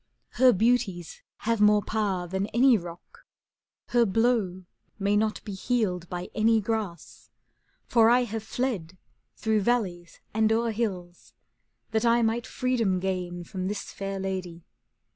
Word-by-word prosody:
Her 255 0 +5
beauties 200 -5 0 0.2
have 230 -1 +1
more 210 0 +5
power 200 -5 -1
than 190 +3 -2
any 250 +2 +4
rock, 175 - -8 0.7
Her 240 -1 +4
blow 215 -4 +1 0.3
may 200 0 +1
not 215 0 0
be 205 - -5
healed 190 -4 -1
by 180 0 -5
any 225 +1 +3
grass; 210 -5 -4 0.6
^ - - -43
For 230 -1 +5
I 245 +1 +4
have 225 -2 -4
fled 210 -7 -3 0.4
through 215 - +1
valleys 190 -7 -1
and 220 0 +2
o'er 230 +1 +1
hills. 180 - -4 0.6
That 220 +1 +1
I 235 0 +4
might 230 +2 0
freedom 235 -9 0
gain 180 -2 -3
from 185 +1 -5
this 205 +1 -4
fair 195 0 -4
lady. 185 -3 -4
210 Hz, 145 wpm, -27 LUFS, 185-230 Hz, 0.7 s, Her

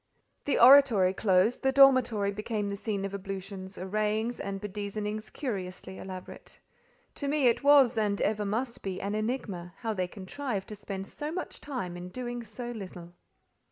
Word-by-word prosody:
The 290 - +1
oratory 240 -8 +7
closed, 195 +3 +2
the 265 - +2
dormitory 255 -7 +5
became 210 0 -3
the 200 - -3
scene 200 -1 -3
of 195 - -5
ablutions, 195 0 -6
arrayings 215 +4 -1
and 195 0 -4
bedizenings 210 +1 -4
curiously 190 -7 -5
elaborate. 185 -1 -9 0.6
To 285 - -4
me 290 -1 +1
it 240 +3 +3
was, 275 -5 +6
and 205 -2 0
ever 210 0 +1
must 230 +4 -2
be 190 -1 -4
an 200 +1 -3
enigma, 210 -6 -3
how 225 -2 -2
they 185 -3 -1
contrived 200 +3 -5
to 210 - -6
spend 195 -1 -6
so 295 +8 -6
much 365 +2 -5
time 245 -12 -4
in 175 +1 -7
doing 240 +2 -5
so 235 +2 -7
little. 180 -6 -8
210 Hz, 160 wpm, -29 LUFS, 195-240 Hz, 0.6 s, oratory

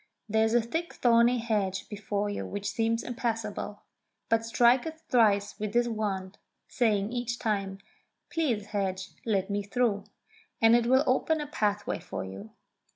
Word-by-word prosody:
There 220 +1 +2
is 220 +1 +2
a 240 - +4
thick 325 +9 -3
thorny 235 0 +4
hedge 210 -5 -1
before 205 -1 -2
you 205 - -3
which 205 0 -3
seems 230 +2 0
impassable. 225 -4 -3 0.5
But 225 0 +3
strike 240 +4 +4
it 320 0 -7
thrice 210 -5 +3
with 210 -1 -3
this 240 0 +3
wand, 205 -4 -3 0.3
saying 215 -3 +1
each 240 -1 -2
time, 200 -5 -1 0.3
* - - -52
Please, 255 -11 0
hedge, 195 -2 -2 0.2
let 200 -2 0
me 205 0 0
through,' 205 -1 0 0.5
and 225 +1 +6
it 240 -1 +2
will 260 +3 +5
open 300 +5 +2
a 300 - -3
pathway 210 -7 -1
for - - -6
you. 95 +3 -9
220 Hz, 160 wpm, -29 LUFS, 205-240 Hz, 0.5 s, and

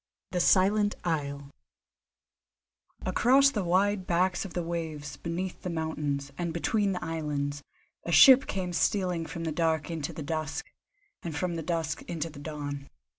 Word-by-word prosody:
THE 180 - 0
SILENT 205 +3 +4
ISLE 140 -4 -2 1.5
Across 275 +3 +5
the 210 -7 -1
wide 190 +2 +1
backs 180 +2 +1
of 185 - -9
the 175 - -1
waves, 160 -4 -4
beneath 175 +2 -4
the 180 - -4
mountains, 150 -4 -2
and 170 -1 -1
between 200 +4 +1
the 180 - -4
islands, 145 -3 -2 0.4
a 170 - -4
ship 260 - +8
came 180 -2 -3
stealing 175 -1 +1
from 170 - -6
the 160 - -1
dark 160 -1 0
into 160 -3 -3
the 155 - -6
dusk, 155 0 -3 0.5
and 165 -3 -5
from 180 0 -1
the 165 - -3
dusk 160 -1 -2
into 165 -1 -3
the 145 - -11
dawn. 145 -2 -5
165 Hz, 155 wpm, -29 LUFS, 150-180 Hz, 1.5 s, ship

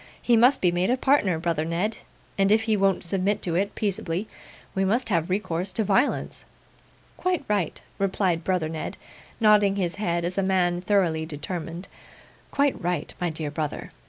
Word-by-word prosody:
He 240 - +3
must 250 +4 +5
be 180 - +4
made 175 +2 0
a 250 - +2
partner, 255 - +2
brother 165 -2 -1
Ned; 175 +7 -1 0.4
and 195 0 +2
if 220 +1 +4
he 220 -1 +2
won't 195 -1 +2
submit 195 +3 0
to 170 - -1
it 195 +4 0
peaceably, 195 -1 -2 0.5
we 190 - 0
must 230 +5 +1
have 170 -4 +1
recourse 185 -1 -1
to 220 - 0
violence.' 200 +7 0 0.7
'Quite 365 -5 -1
right,' 200 -6 -1 0.2
replied 190 -3 0
brother 180 -3 0
Ned, 160 -1 -5 0.4
nodding 210 -3 +5
his 180 -3 -2
head 170 -3 0
as 180 +3 -1
a - - +3
man 180 -2 +1
thoroughly 175 -5 +1
determined; 165 +3 -5 0.6
'quite 280 -1 +1
right, 175 +1 -2
my 175 - +1
dear 155 -2 -4
brother. 150 -1 -4
185 Hz, 170 wpm, -25 LUFS, 170-210 Hz, 0.7 s, must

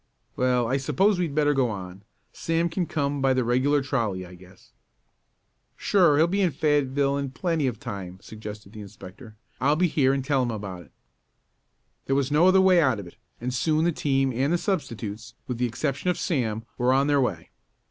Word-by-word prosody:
"Well, 125 -2 +1
I 130 +4 +1
suppose 190 +8 +1
we'd 165 -5 -2
better 145 -1 +3
go 130 -3 +1
on. 95 -2 -7 0.3
Sam 165 +1 -1
can 170 +1 -2
come 140 -2 -2
by 135 -1 +3
the 130 - +1
regular 130 +4 +2
trolley, 110 -9 -2
I 90 - -13
guess." 90 +1 -17 1.1
"Sure, 175 -7 +3
he'll 160 - +5
be 195 +4 0
in 185 - +3
Fayetteville 140 -1 +1
in 140 -1 -3
plenty 160 +1 -1
of 120 -3 -3
time," 100 -8 -7
suggested 105 -1 -10
the 110 - -9
inspector. 100 +3 -12 0.2
"I'll 145 +3 +3
be 180 +3 +2
here 135 -4 +2
and 135 -1 -2
tell 140 -2 +2
him 125 - -1
about 100 -5 -6
it." 85 - -18 1.2
There 135 - +1
was 140 0 0
no 155 +5 +5
other 190 0 +5
way 185 -2 +5
out 130 -8 +2
of 100 - -7
it, 85 - -13 0.2
and 125 +2 -3
soon 155 +5 +1
the 175 - +3
team 135 -4 0
and 135 +5 0
the 175 - +3
substitutes, 115 - -4
with 125 -2 -5
the 125 - +1
exception 140 +7 -2
of 180 - 0
Sam, 115 -8 -2
were 125 +1 +3
on 135 +1 +3
their 145 -1 +2
way. 90 -10 -3
135 Hz, 200 wpm, -25 LUFS, 115-150 Hz, 1.2 s, he'll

